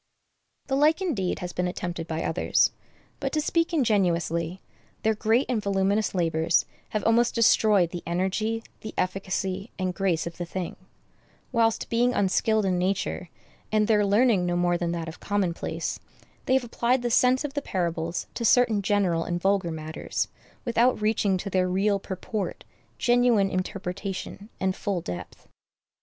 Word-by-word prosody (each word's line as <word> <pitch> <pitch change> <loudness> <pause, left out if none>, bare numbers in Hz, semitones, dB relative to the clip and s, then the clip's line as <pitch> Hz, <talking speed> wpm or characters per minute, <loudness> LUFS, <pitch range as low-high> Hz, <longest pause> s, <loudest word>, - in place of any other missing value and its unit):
The 270 - -1
like, 305 +4 +4
indeed, 260 - -1
has 180 0 -5
been 180 0 -1
attempted 175 -2 -4
by 160 0 -2
others; 160 - +2 0.5
but, - - -2
to 310 - +2
speak 330 +3 +1
ingenuously, 180 - +1 0.4
their 220 - +3
great 220 +4 +2
and 240 -4 0
voluminous 200 +1 +1
labors 165 -1 +2 0.2
have 215 -2 -2
almost 235 +1 +3
destroyed 210 -6 +4
the 175 - -5
energy, 195 +6 -1 0.2
the 215 - -8
efficacy, 190 +2 -2
and 185 -1 -1
grace 180 -3 0
of 170 0 -6
the - - -1
thing; 180 0 -4 0.8
whilst, 230 -2 +2
being 245 +2 +2
unskilled 215 +2 +2
in 185 -2 +1
nature, 185 -1 -1 0.4
and 215 -1 +3
their 210 -2 +4
learning 205 -2 +3
no 175 - 0
more 175 0 +2
than 175 -1 -1
that 165 -1 -4
of 165 - -8
commonplace, 195 -4 -2 0.5
they 260 - +3
have 265 - +2
applied 240 +1 0
the 240 - 0
sense 255 +4 +4
of 290 -2 -4
the 285 - -2
parables 170 -5 -2
to 235 - -4
certain 230 -2 +4
general 190 -5 +1
and 175 0 -2
vulgar 195 -1 +1
matters, 155 -1 -3 0.4
without 240 0 +3
reaching 210 -3 +1
to 190 - -6
their 185 -1 +1
real 200 +2 +2
purport, 195 +1 -4 0.3
genuine 240 -5 +3
interpretation, 195 +2 -4
and 190 0 0
full 200 -3 -2
depth. 90 - -8
195 Hz, 155 wpm, -26 LUFS, 180-225 Hz, 0.8 s, like